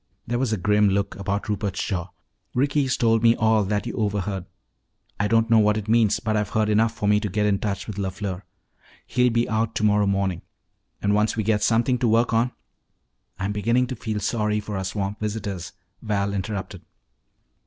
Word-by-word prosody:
There 120 +1 -1
was 130 -3 0
a 110 - +1
grim 105 +2 +3
look 100 0 -1
about 100 +1 -2
Rupert's 100 -2 -2
jaw. 90 -3 -2 0.5
"Ricky's 140 0 +1
told 115 -1 +3
me 115 0 +5
all 110 -1 +3
that 105 +2 -1
you 120 - -4
overheard. 100 -3 -2 0.7
I 105 - +2
don't 115 +1 +3
know 115 - +7
what 105 0 +3
it 105 -1 -5
means 110 -2 +3
but 110 -1 -1
I've 105 -2 0
heard 110 -1 +1
enough 110 +2 +3
for 105 - -2
me 105 0 +4
to 105 -1 -3
get 105 +2 0
in 100 -2 +2
touch 100 -2 -3
with 105 -3 -7
LeFleur. 95 -1 -3 0.6
He'll 125 0 +2
be 115 0 +1
out 110 +1 -1
tomorrow 105 -1 +3
morning. 95 -3 0 0.6
And 100 0 +2
once 105 +2 +1
we 110 - +1
get 105 0 +1
something 120 +2 +2
to 120 - +1
work 115 +2 +2
on 115 +2 +2 0.4
" - - -46
"I'm 95 +2 -1
beginning 115 +5 +1
to 130 +1 -5
feel 110 -2 -3
sorry 105 -1 0
for 105 0 -6
our 95 0 -2
swamp 100 +1 -3
visitors," 100 -5 -4 0.3
Val 100 -3 -1
interrupted. 100 0 -4
105 Hz, 195 wpm, -24 LUFS, 100-115 Hz, 0.7 s, know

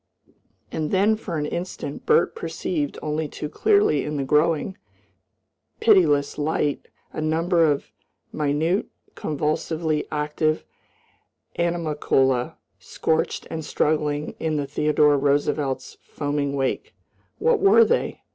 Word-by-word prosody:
And 155 -1 -2
then 200 +3 +3
for 185 -6 -5
an 150 - -1
instant 170 -3 -5
Bert 455 +1 +4
perceived 320 -9 -3
only 155 0 -1
too 150 - -6
clearly 420 - +3
in 150 0 -3
the 140 - -1
growing, 155 +6 +1 1.0
pitiless 160 -12 +3
light 150 -1 -1 0.3
a - - -4
number 165 +1 +2
of 140 - -3 0.4
minute, 155 +6 0 0.3
convulsively 155 +1 -2
active 150 +1 -1 0.9
animalcula 150 -7 +1 0.2
scorched 160 0 -1
and 160 -1 -4
struggling 150 -1 0
in 160 -1 -1
the 145 - -1
Theodore 150 0 +2
Roosevelt's 140 -1 -1
foaming 145 -1 -2
wake. 140 - -2 0.4
What 475 -2 +2
were 415 +3 +6
they? 485 +2 -1
155 Hz, 110 wpm, -23 LUFS, 145-170 Hz, 1.0 s, were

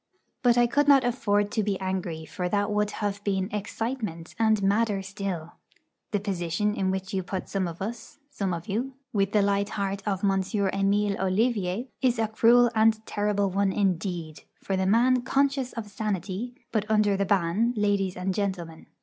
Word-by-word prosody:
But 245 -2 +4
I 240 - +6
could 285 +5 +2
not 275 -2 +7
afford 205 -4 +1
to 220 - +1
be 200 -2 -1
angry, 185 -4 -3
for 180 +2 -3
that 205 +2 0
would 210 0 +1 0.2
have 205 0 -3
been 195 -1 -1
'excitement' 210 -5 -4
and 220 -2 +3
madder 200 0 +2
still. 190 -4 -5 0.6
The 205 - 0
position 195 +1 -1
in 190 -2 0
which 190 +2 -3
you 190 - 0
put 185 +1 -5
some 195 -2 -1
of 170 +2 -6
us 230 +3 -7
some 200 -9 -2
of 170 +2 -4
you 245 +6 -2 0.2
with 195 -2 +1
the 210 -2 +3
light 200 0 +1
heart 195 -1 -2
of 195 -1 -1
M. 195 -1 +3 0.3
Emile 200 +1 +1
Ollivier 195 +2 0 0.2
is 250 -3 +2
a 225 -1 +1
cruel 235 +2 +5
and 220 0 +3
terrible 205 -1 0
one, 195 +1 +1
indeed, 175 -5 -1 0.2
for 195 - -1
the 190 0 0
man 245 +5 +4
conscious 270 0 +1
of 225 -3 -5
sanity, 205 +3 -3 0.2
but 215 -2 -1
under 210 -2 +3
the 200 - +1
ban, 195 +3 +2
ladies 200 -3 +1
and 185 +1 -1
gentlemen. 180 -5 -3
200 Hz, 180 wpm, -27 LUFS, 190-220 Hz, 0.6 s, not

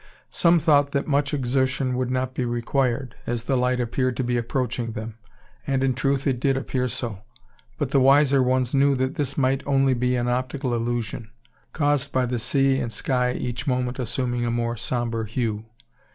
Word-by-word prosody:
Some 170 0 +4
thought 145 -3 +3
that 140 - 0
much 145 -1 +1
exertion 130 -1 0
would 125 0 -1
not 130 0 -1
be 130 - -2
required; 120 +1 -1
as 120 -1 -2
the 135 - 0
light 125 0 +1
appeared 125 +1 -1
to 130 - 0
be 125 0 0
approaching 120 -1 -2
them. 110 +1 -7 0.5
And, 135 -1 +1
in 135 -1 +2
truth, 135 +2 0
it 130 -4 +1
did 135 +1 +1
appear 130 -1 -1
so; 115 -3 -4 0.6
but 140 -3 -2
the 140 - +4
wiser 135 +1 +5
ones 130 -1 +1
knew 140 0 +4
that 130 +1 -1
this 140 -2 -3
might 135 -1 +2
be - - -16
only 130 -3 +2
an 120 0 0
optical 130 +1 -1
illusion, 115 -1 -3 0.4
caused 145 -1 0
by 130 -1 +1
the 120 -1 -2
sea 135 +3 +2
and 120 - -3
sky 125 +2 0
each 125 +4 -4
moment 125 -1 -1
assuming 125 0 -1
a 120 - 0
more 115 0 -1
sombre 115 -1 -2
hue. 110 -2 -2
130 Hz, 185 wpm, -24 LUFS, 120-135 Hz, 0.6 s, wiser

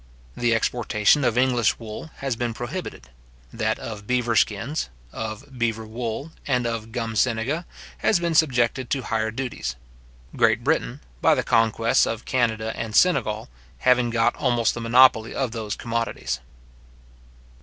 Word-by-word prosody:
The 120 -1 +2
exportation 115 +3 +2
of 120 -2 +1
English 125 -3 +3
wool 115 +7 -8
has 135 -3 -3
been 120 -1 -3
prohibited. 120 - -6 0.4
That 110 0 0
of 105 -2 -8
beaver 120 -2 +1
skins, 115 - 0 0.2
of 110 +4 -7
beaver 115 -1 -1
wool, 115 +6 -5 0.2
and 125 -3 +1
of 115 -1 -3
gum 115 -2 -3
senega, 125 - 0 0.3
has 200 - +3
been 170 -1 -1
subjected 130 -5 +2
to 135 -2 -1
higher 110 -1 -1
duties; 125 - -4 0.6
Great - - +3
Britain, - - 0 0.2
by - - +5
the - - 0
conquests 115 0 +3
of 115 0 -4
Canada 110 -3 0
and 110 -1 -4
Senegal, 110 -12 +2 0.3
having 125 - +3
got 115 +1 +2
almost 120 -2 +2
the 120 - -5
monopoly 115 -1 +5
of 130 -4 -1
those 110 -3 -4
commodities. 115 - -3
115 Hz, 145 wpm, -24 LUFS, 110-125 Hz, 0.6 s, by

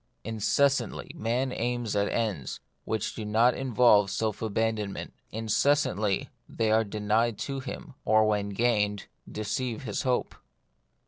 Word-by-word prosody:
Incessantly 115 +3 +1
man 125 +4 -1
aims 120 -3 -2
at 100 0 +2
ends 105 - -2 0.3
which 110 -2 -2
do 110 - -6
not 110 +4 +3
involve 120 -5 +4
self 110 +1 -2
abandonment; 110 -2 -2 0.2
in 110 +1 -4
cessantly 110 -5 +1 0.2
they 110 -1 0
are 110 +1 +4
denied 105 +2 0
to 135 -1 -3
him; 145 +3 -7
or, 110 0 +4
when 105 -1 +1
gained, 105 -2 +1 0.3
deceive 110 +3 -3
his 105 -5 -2
hope. 125 -1 0
110 Hz, 130 wpm, -28 LUFS, 105-120 Hz, 0.3 s, involve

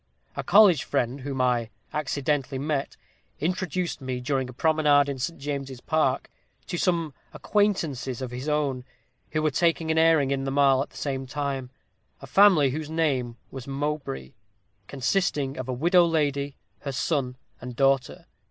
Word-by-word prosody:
A - - -3
college 195 -6 +6
friend, 125 +3 -1
whom 135 0 -4
I 120 -3 +1 0.2
accidentally 140 -1 -1
met, 140 0 -2 0.4
introduced 180 0 -2
me, 130 -1 -3
during 130 0 -1
a - - -9
promenade 150 0 +3
in 140 -2 -4
St. 165 +7 -3
James's 135 -2 -4
Park, 145 -2 0 0.4
to 175 - -4
some 170 -5 0 0.2
acquaintances 165 - 0
of 130 -2 -5
his 130 +4 -4
own, 145 -4 0 0.5
who 155 0 -1
were 155 - +2
taking 165 +2 +1
an 160 - +2
airing 160 -4 +4
in 135 -1 0
the 135 - -2
Mall 135 -1 +4
at - - -4
the - - -15
same 135 -2 -3
time 140 -2 -3 0.5
a - - -10
family 185 -9 +5
whose 155 +2 -4
name 135 -7 0
was 130 -1 -8
Mowbray, 135 - -3 0.6
consisting 140 0 0
of 130 0 -6
a - - +1
widow 170 +8 +4
lady, 145 -3 0 0.2
her 140 - -5
son, 130 -2 -1 0.2
and 125 0 -7
daughter. 135 -1 +1
140 Hz, 160 wpm, -26 LUFS, 130-155 Hz, 0.6 s, college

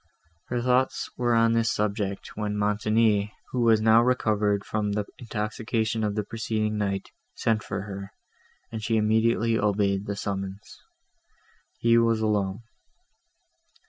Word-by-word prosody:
Her 120 -1 -2
thoughts 130 +1 +1
were 120 -1 +1
on 115 0 +4
this 115 -1 +2
subject, 100 -2 -2
when 105 -1 -2
Montoni, 105 0 +1 0.2
who 125 - -1
was 115 -2 +4
now 110 +1 +6
recovered 105 -5 +1
from 105 -1 -1
the 105 0 -1
intoxication 110 -1 -2
of 105 -1 -1
the 105 - -1
preceding 110 0 -2
night, 100 -2 -2 0.2
sent 110 -1 +1
for - - -4
her, 100 -1 -7 0.6
and 110 -1 -5
she 115 0 +1
immediately 110 +1 +2
obeyed 100 -1 +1
the 100 - -2
summons. 100 0 -5 1.0
He 115 0 +4
was 115 -1 +2
alone. 105 -1 0
110 Hz, 135 wpm, -26 LUFS, 105-115 Hz, 1.0 s, now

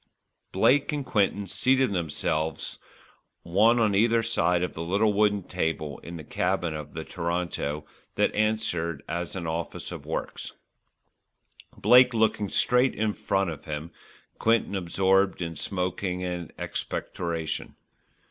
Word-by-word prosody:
Blake 145 +4 +3
and 145 -2 -3
Quinton 100 -2 +1
seated 130 +4 +2
themselves 80 -2 -2 0.6
one 105 +8 +4
on 110 -3 +3
either 115 +3 +3
side 90 -6 +2
of 90 - -2
the 80 - -6
little 100 +6 +2
wooden 105 -1 +2
table 80 -5 -2
in 85 - -9
the 80 - -8
cabin 90 0 -1
of 75 -1 -7
the - - -4
Toronto 85 -3 -3 0.3
that - - +2
answered 95 -8 0
as 85 +2 -3
an 90 -3 -4
office 80 0 -3
of - - -7
works, - - -4 1.2
Blake 125 0 +6
looking 110 -2 +2
straight 125 +5 +3
in 110 -1 0
front 95 -3 0
of 75 - -9
him, 75 +1 -5 0.5
Quinton 115 -2 +2
absorbed 95 +2 +2
in 85 -2 -4
smoking 90 0 -2
and 90 -2 -4
expectoration. 85 -2 -4
90 Hz, 130 wpm, -27 LUFS, 85-110 Hz, 1.2 s, Blake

